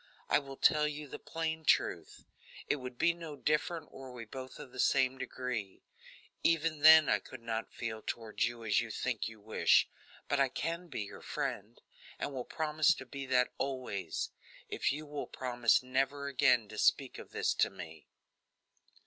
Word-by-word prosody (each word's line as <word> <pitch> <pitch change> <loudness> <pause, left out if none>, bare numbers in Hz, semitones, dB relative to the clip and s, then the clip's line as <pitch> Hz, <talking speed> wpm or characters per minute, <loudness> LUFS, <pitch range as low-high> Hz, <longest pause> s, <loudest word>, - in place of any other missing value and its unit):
I - - +6
will 135 -2 -9
tell 150 0 +4
you 150 0 -5
the - - -8
plain 160 -1 -3
truth; - - +1 0.4
it - - +1
would 125 -2 -8
be 170 +5 +3
no 165 -3 -8
different 150 +3 -1
were 135 -1 -9
we 120 -2 -8
both 130 +3 -8
of 130 - -10
the 130 - -10
same 130 0 +3
degree; 125 -6 -4 0.6
even 165 -1 +2
then 155 +1 +9
I - - +3
could 130 -3 -11
not 115 -1 -3
feel 110 -2 -5
toward 115 -2 -5
you 120 0 0
as 105 - +3
you 115 - -5
think 120 +1 -2
you 110 -1 -13
wish, 110 +2 +3 0.4
but 145 - +1
I 135 -1 +4
can 170 +6 -3
be 130 -9 -4
your 100 - -10
friend, - - -4 0.4
and 145 - -3
will 125 -2 -4
promise 155 -1 +2
to 135 - -9
be 135 +2 -7
that 125 -1 +2
always, 130 -8 -3 0.4
if - - 0
you 150 +2 -5
will 145 -1 -5
promise 120 -2 +2
never 135 +2 0
again 125 -5 +3
to 110 - -7
speak - - +2
of - - -10
this - - 0
to - - +2
me." - - -10
130 Hz, 180 wpm, -33 LUFS, 120-150 Hz, 0.6 s, then